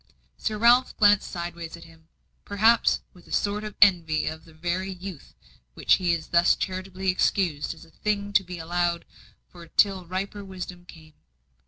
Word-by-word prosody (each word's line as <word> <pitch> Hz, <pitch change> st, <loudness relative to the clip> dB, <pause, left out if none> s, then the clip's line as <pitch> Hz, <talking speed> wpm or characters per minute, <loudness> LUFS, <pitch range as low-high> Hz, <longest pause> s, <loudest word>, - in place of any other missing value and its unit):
Sir 215 Hz, -, -3 dB
Ralph 240 Hz, +3 st, +4 dB
glanced 205 Hz, -1 st, +4 dB
sideways 170 Hz, -2 st, -6 dB
at 170 Hz, -, -13 dB
him 160 Hz, -1 st, -18 dB, 0.4 s
perhaps 220 Hz, +3 st, +3 dB
with 180 Hz, -2 st, -19 dB
a -, -, -15 dB
sort 205 Hz, +1 st, 0 dB
of 210 Hz, -1 st, -7 dB
envy 170 Hz, -6 st, +3 dB
of 160 Hz, 0 st, -5 dB
the 165 Hz, -, -17 dB
very 175 Hz, +4 st, -2 dB
youth 185 Hz, -4 st, -9 dB, 0.4 s
which -, -, +3 dB
he 175 Hz, -2 st, +1 dB
thus 170 Hz, +2 st, +3 dB
charitably 185 Hz, 0 st, -3 dB
excused 175 Hz, -5 st, 0 dB
as -, -, -15 dB
a -, -, -22 dB
thing 205 Hz, +1 st, -2 dB
to 195 Hz, -, +4 dB
be 180 Hz, -1 st, -8 dB
allowed 170 Hz, +1 st, -1 dB, 0.4 s
for 170 Hz, -2 st, -14 dB
till 190 Hz, 0 st, +2 dB
riper 195 Hz, +3 st, -4 dB
wisdom 180 Hz, -2 st, -8 dB
came. 160 Hz, -2 st, -15 dB
180 Hz, 165 wpm, -25 LUFS, 170-200 Hz, 0.4 s, Ralph